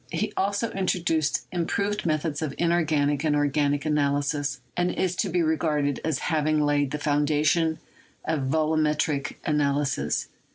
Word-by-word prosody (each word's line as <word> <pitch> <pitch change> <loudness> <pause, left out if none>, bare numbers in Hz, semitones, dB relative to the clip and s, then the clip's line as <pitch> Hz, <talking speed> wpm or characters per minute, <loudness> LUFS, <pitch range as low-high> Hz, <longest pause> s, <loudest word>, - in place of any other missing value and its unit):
He 210 0 -2
also 200 +4 0
introduced 170 -5 0
im 170 -2 -1
proved 205 -2 -1
methods 155 -1 -1
of 155 -3 -3
inorganic 155 -4 +1
and 155 -2 +2
organic 145 0 +1
analysis, 145 -1 0 0.2
and 175 0 +1
is 185 -1 -1
to 195 - 0
be 175 0 +1
regarded 150 -3 0
as 155 -4 0 0.2
having 155 0 +2
laid 145 -1 +2
the 150 - -3
foundations 150 +2 +1 0.5
of 155 -2 0
volumet 155 0 +1
ric 145 -2 -3
analysis. 140 - 0
155 Hz, 140 wpm, -26 LUFS, 145-165 Hz, 0.5 s, and